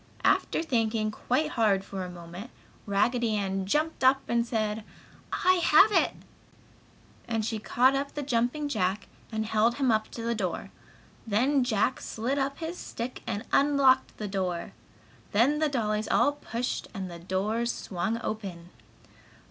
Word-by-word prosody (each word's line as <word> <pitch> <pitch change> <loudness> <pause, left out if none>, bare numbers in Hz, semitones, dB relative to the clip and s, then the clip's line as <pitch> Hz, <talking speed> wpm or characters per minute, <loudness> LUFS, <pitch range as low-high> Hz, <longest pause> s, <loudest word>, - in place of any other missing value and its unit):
After - - +2
thinking 225 -6 0
quite 260 +7 0
hard 205 -5 +2
for 195 -2 -5
a 180 - -6
moment, 175 +5 -9 0.4
Raggedy 225 +3 +1
Ann 195 -1 -2
jumped 305 +6 0
up 270 +1 +5
and 235 0 +2
said: 220 -2 -2 0.5
"I 370 -1 +3
have 385 +8 +7
it!" - - +3 1.1
And 225 -2 -1
she 225 -1 -2
caught 255 +5 +3
up 280 +1 -2
the 295 - -2
Jumping 250 +3 0
Jack 200 -6 -1 0.2
and 220 0 -2
held 220 +2 +2
him 265 -4 +2
up 215 0 +1
to 230 - -7
the 235 0 0
door; 195 -6 -3 0.6
then 255 +6 +2
Jack 240 0 +1
slid 255 +6 -2
up 275 +1 -1
his 335 +2 -5
stick 240 +2 -6
and 215 -2 -3
unlocked 275 -2 +4
the 210 - -4
door. 185 -3 -3 0.6
Then 260 +8 +3
the 310 -1 +2
dollies 215 -5 -1
all 285 - +3
pushed 250 -4 -4
and 190 -2 -4
the 170 - -8
door 200 +7 -1
swung 220 0 -2
open. 185 -5 -5
230 Hz, 155 wpm, -28 LUFS, 205-265 Hz, 1.1 s, have